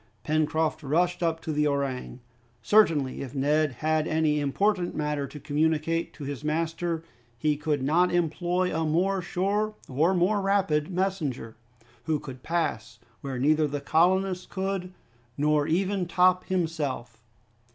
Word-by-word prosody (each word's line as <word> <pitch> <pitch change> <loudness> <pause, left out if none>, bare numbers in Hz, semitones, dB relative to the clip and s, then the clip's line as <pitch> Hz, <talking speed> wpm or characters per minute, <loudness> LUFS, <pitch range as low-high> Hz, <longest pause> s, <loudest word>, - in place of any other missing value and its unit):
Pencroft 155 0 0
rushed 175 +5 +1
up 165 -1 0
to 160 - -4
the 150 0 +2
orang. 140 -3 -2 0.4
Certainly 160 - +3
if 135 0 -7
Neb 150 +3 +2
had 155 +4 0
any 155 -1 +1
important 180 +6 0
matter 150 -2 -1
to 150 - -10
communicate 155 +3 0
to 150 - -9
his 140 0 -5
master 165 +2 -1 0.3
he 150 +5 +1
could 145 -2 -1
not 170 +6 +3
employ 175 +1 0
a 160 - 0
more 180 +5 +1
sure 200 +5 -1
or 160 +8 +2
more 195 +4 +2
rapid 195 -6 +1
messenger, 175 - -2 0.5
who 155 -2 0
could 130 -3 -9
pass 145 -9 -2 0.2
where 135 -2 -4
neither 150 +4 +3
the 145 0 -3
colonists 180 +5 +2
could, 190 -1 -3 0.5
nor 150 0 +2
even 185 +2 0
Top 180 +1 +3
himself. 150 -10 -2
160 Hz, 140 wpm, -27 LUFS, 145-180 Hz, 0.5 s, Certainly